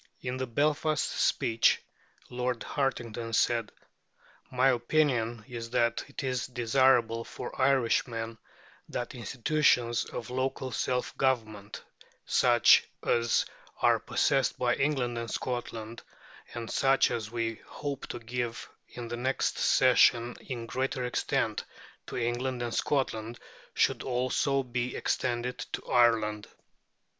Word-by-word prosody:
In 125 0 -3
the 130 0 -3
Belfast 150 +4 +1
speech 115 0 +2 0.5
Lord 125 -1 -2
Hartington 120 -4 -2
said: 115 -2 +1 0.8
"My 130 +1 +3
opinion 120 -3 +1
is 115 -2 -6
that 115 -1 +1
it 140 - -7
is 125 -3 -1
desirable 120 -1 +2
for - - -8
Irishmen 115 -3 +1 0.5
that 120 +1 -4
institutions 125 0 +1
of 120 +1 -7
local 130 0 -2
self 125 +1 -1
government 110 -6 -1 0.4
such 120 -2 +5 0.2
as 115 -1 +2 0.4
are - - +5
possessed 135 -2 +1
by 125 -1 +2
England 130 -4 0
and 115 -1 -5
Scotland, 115 -2 -4 0.5
and 115 -1 -5
such 135 0 +3
as 110 -2 -3
we 115 -1 -3
hope 140 -2 -5
to - - -5
give 120 0 -4 0.2
in 120 -1 -7
the 120 +1 -4
next 130 +3 -1
session 120 0 +4
in 120 -4 -6
greater 130 +1 -2
extent 125 - -1 0.4
to - - -5
England 120 +1 -1
and 120 -1 -3
Scotland, 120 -5 -1 0.4
should - - +2
also 130 +2 0
be 125 0 -3
extended 125 0 -1
to - - -4
Ireland." 110 -3 +2
120 Hz, 120 wpm, -29 LUFS, 115-130 Hz, 0.8 s, such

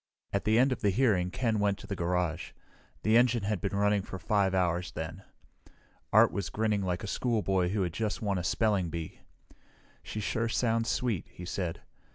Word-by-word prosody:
At 100 - 0
the 110 +1 +4
end 130 +3 +4
of 130 - -2
the 105 - +3
hearing 100 -5 +2
Ken 115 +1 0
went 100 -1 +1
to - - -11
the 100 - -4
garage. 90 -1 -1 0.5
The 110 +1 +3
engine 120 -2 +4
had 100 -3 -1
been 100 - -2
running 105 0 +2
for 95 - -7
5 95 +2 +1
hours 90 -1 0
then. 80 +4 -5 0.9
Art - - +6
was 100 -3 -3
grinning 110 -2 0
like 90 0 -2
a - - -4
schoolboy 100 -6 +1
who 100 0 0
had 85 -2 -2
just 110 +2 -2
won 100 -4 -1
a - - -4
spelling 100 -1 +1
bee. 80 -1 -6 0.8
"She 110 - -6
sure 115 +2 -1
sounds 115 -1 +1
sweet," 120 -8 -1
he 90 - -10
said. 90 -2 -3
100 Hz, 195 wpm, -30 LUFS, 90-110 Hz, 0.9 s, Art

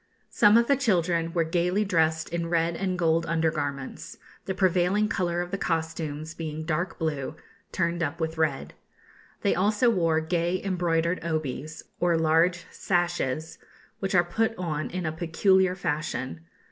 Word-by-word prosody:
Some 210 +2 +6
of 235 - +4
the 280 - +3
children 175 -9 +1
were 170 -1 +1
gaily 180 +5 +1
dressed 160 -4 +1
in 170 -1 -3
red 165 0 +1
and 185 0 -2
gold 165 -1 +2
under 165 -1 +1
garments, 140 -3 -5 0.3
the 190 - -3
prevailing 190 +2 +2
colour 175 -4 -1
of 175 0 -5
the 195 - -2
costumes 160 -1 -3
being 160 -1 -5
dark 165 +2 -2
blue, 150 -3 -2 0.4
turned 170 -1 -1
up 165 +1 -2
with 160 0 -2
red. 155 -4 -1 0.7
They - - +3
also 210 +6 +3
wore 165 -6 +2
gay 170 +2 0
embroidered 175 -2 0
obis, 155 -1 -4 0.2
or 175 -1 +2
large 165 +2 +2
sashes, 170 -4 -1 0.4
which 195 0 -1
are 175 - +6
put 225 +6 0
on 155 -4 -3
in 180 -1 -4
a 155 - 0
peculiar 180 +3 +2
fashion. 155 -3 -3
170 Hz, 155 wpm, -26 LUFS, 160-180 Hz, 0.7 s, Some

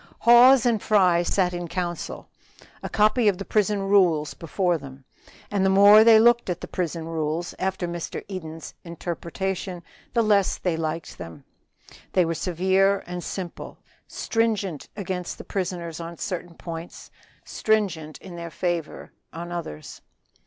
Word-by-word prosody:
HAWES 245 +2 +7
and 230 -4 +2
Fry 185 -5 +3
sat 180 0 +1
in 175 0 -4
council. 175 0 -4 0.5
A - - -5
copy 215 +2 +3
of 200 -3 +3
the 195 - -6
prison 210 -1 +1
rules 180 -7 +3
was - - -8
before 175 +1 -1
them, 135 -1 -12 0.5
and 200 -2 +1
the 190 - +3
more 200 +3 +8
they 225 -1 +7
looked 240 -1 +4
at 175 -1 -2
them - - -8 0.9
after 190 -1 -2
Mr. 170 -1 -5
Eden's 165 -5 -7
interpretation, 175 +2 -4 0.3
the 230 - +4
less 205 -3 +2
they 180 -3 -1
liked 160 -1 -4
them: 85 -1 -9 0.7
they 180 -2 +4
were 165 - -1
severe 190 +3 +1
and 180 0 -6
simple; 180 -3 -6 0.3
stringent 210 -8 -1
against 185 -3 -4
the - - -9
prisoners 175 -4 -4
on 170 0 -7
certain 175 -1 -5
points; 165 0 -8 0.3
stringent 190 -8 -1
in 185 -3 -11
their 170 0 -6
favor 170 -1 -3 0.2
on 170 +1 -7
others. 160 - -7
180 Hz, 145 wpm, -24 LUFS, 170-200 Hz, 0.9 s, more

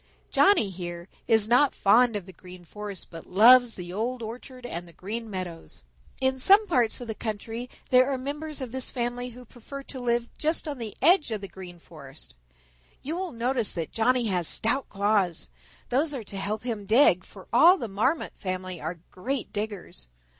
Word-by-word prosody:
"Johnny, 385 - +4
here, 175 -1 -7 0.2
is 220 -2 +4
not 250 +4 +4
fond 235 +3 +4
of 200 -4 -4
the 190 - -12
Green 180 0 -13
Forest, 205 +1 -7
but 165 -1 -10
loves 240 +5 +7
the 175 -1 -7
Old 235 +4 -2
orchard 250 +3 -8
and 175 -7 -5
the 170 - -16
Green 220 +7 -6
Meadows. 175 - -7 0.4
In 265 0 +1
some 395 +10 +6
parts 250 - +1
of 245 - -7
the 220 - -3
country 225 +3 -5 0.2
there 255 +1 +6
are 270 - 0
members 295 +3 -5
of 255 -2 -6
his 260 -1 -3
family 245 0 -3
who 250 +1 -12
prefer 265 +4 -10
to 270 - -8
live 240 -1 0
just 315 +1 0
on 285 -3 -4
the 220 -3 -6
edge 345 -1 +5
of 215 -3 -3
the 195 - -6
Green 180 -2 -11
Forest. 155 -4 -13 0.7
You 310 +5 -3
will 365 -1 -3
notice 240 -1 -1
that 165 -3 -4
Johnny 245 +2 +2
has 180 -6 0
stout 255 +5 +1
claws. 200 - 0 0.4
Those 290 +4 +1
are 245 - -5
to 200 - -10
help 210 +3 -2
him 220 -5 -4
dig, 215 -6 +5
for 190 -1 -14
all 345 +10 +7
the 235 - -4
Marmot 225 +10 0
family 185 -2 -5
are 165 +1 -5
great 255 +7 -4
diggers. 205 - -5
225 Hz, 190 wpm, -27 LUFS, 190-255 Hz, 0.7 s, loves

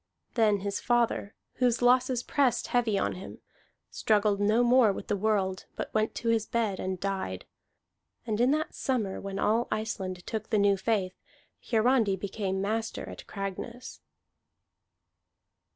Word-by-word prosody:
Then 210 -4 +3
his 200 0 -2
father, 235 -4 0 0.2
whose 245 -2 +2
losses 250 0 +3
pressed 260 -4 +1
heavy 235 -4 +2
on - - 0
him, 185 - -9 0.5
struggled 210 -2 +2
no 215 +4 +3
more 245 -3 +5
with - - -6
the - - +2
world, 195 -2 0
but - - -5
went 215 0 0
to 230 - -2
his 225 -1 +1
bed 225 -6 -1
and 185 -1 -3
died. 190 - -3 0.8
And 220 -1 -1
in 245 - +4
that 310 +2 0
summer 225 -8 -2
when 195 0 -5
all 225 +4 +1
Iceland 190 -4 -3
took 220 -1 -3
to - - -30
the 215 - +2
new 200 -1 +4
faith, 195 -2 0 0.6
Hiarandi 225 -3 +3
became 190 0 -3
master 220 +3 -2
at - - -10
Cragness. 200 +5 -6
215 Hz, 150 wpm, -29 LUFS, 195-235 Hz, 0.8 s, more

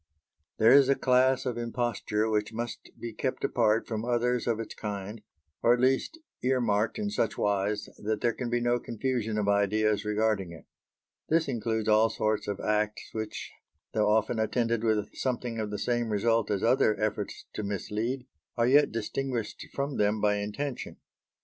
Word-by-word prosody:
There 110 +2 +6
is 135 0 +7
a 140 - +5
class 130 +1 +3
of 120 -2 -2
imposture 115 -2 -1
which 105 -1 0
must 120 +1 -5
be 115 -1 -6
kept 130 +4 -3
apart 110 -1 +2
from 110 -1 -3
others 125 0 0
of 115 -2 +1
its 115 - -5
kind, 105 0 -5 0.4
or 120 - +5
at - - -6
least 130 - +1 0.2
ear 130 +1 +2
marked 110 -2 +1
in 210 -1 -2
such 115 - 0
wise 100 0 0
that 110 0 -1
there 120 - +1
can 125 0 -4
be 120 0 +1
no 120 0 +1
confusion 115 -2 -2
of 105 -1 0
ideas 105 +1 +2
regarding 105 -3 0
it. 80 -4 -13 0.6
This 165 +1 +3
includes 110 -3 -1
all 110 +1 +5
sorts 110 -1 -1
of 100 -1 -3
acts 105 0 -1
which, 110 -1 -5 0.4
though 105 -1 +2
often 110 +2 +2
attended 115 +1 0
with 110 -2 0
something 120 -3 -2
of 110 -1 -2
the 105 - -3
same 120 +2 0
result 115 +2 +1
as 100 -2 -1
other 115 -2 +3
efforts 105 -2 -2
to - - -3
mislead, 105 +5 -3 0.3
are 115 - +3
yet 145 +4 +5
distinguished 115 +1 -3
from 140 0 -3
them 105 +1 +2
by 105 0 +2
intention. 120 +7 -4
110 Hz, 175 wpm, -29 LUFS, 105-120 Hz, 0.6 s, is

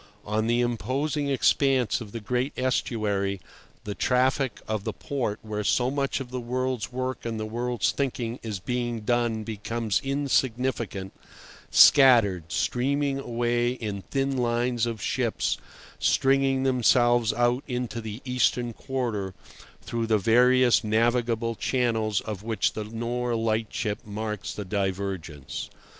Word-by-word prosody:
On 110 +1 0
the 120 +1 +2
imposing 135 +5 -1
expanse 135 -3 +2
of 105 -3 -8
the 115 - -5
great 125 +5 -1
estuary 105 -6 0 0.4
the 105 - -4
traffic 130 +1 +1
of 110 -2 -2
the - - -3
port 120 -7 -3
where 105 -1 -3
so 125 +5 +2
much 140 -1 -1
of 130 -2 -7
the 125 - -3
world's 125 -1 -2
work 130 0 -3
and 115 -1 -3
the 110 - -2
world's 120 0 -1
thinking 125 -3 -2
is 110 -4 -4
being 120 +2 -2
done 120 -1 0
becomes 110 0 -2
insignificant, 130 -7 -1 0.6
scattered, 115 - +6
streaming 140 +2 0
away 120 -1 0
in 105 -5 -5
thin 135 +4 -1
lines 120 -1 +1
of 115 -2 -4
ships - - 0 0.4
stringing 135 0 +2
themselves 120 -2 +3
out 120 +2 +1
into 125 -2 -3
the 110 +2 -7
eastern 125 -1 +1
quarter 115 -8 -3 0.5
through 115 -1 -2
the 110 -1 +3
various 125 +4 +4
navigable 115 +1 +1
channels 115 -3 0
of 105 -3 -6
which 110 0 0
the 110 - -4
Nore 120 +2 -2
lightship 110 -1 -1
marks 105 0 -4
the 105 - -6
divergence. 95 -7 -3
120 Hz, 130 wpm, -26 LUFS, 110-125 Hz, 0.6 s, scattered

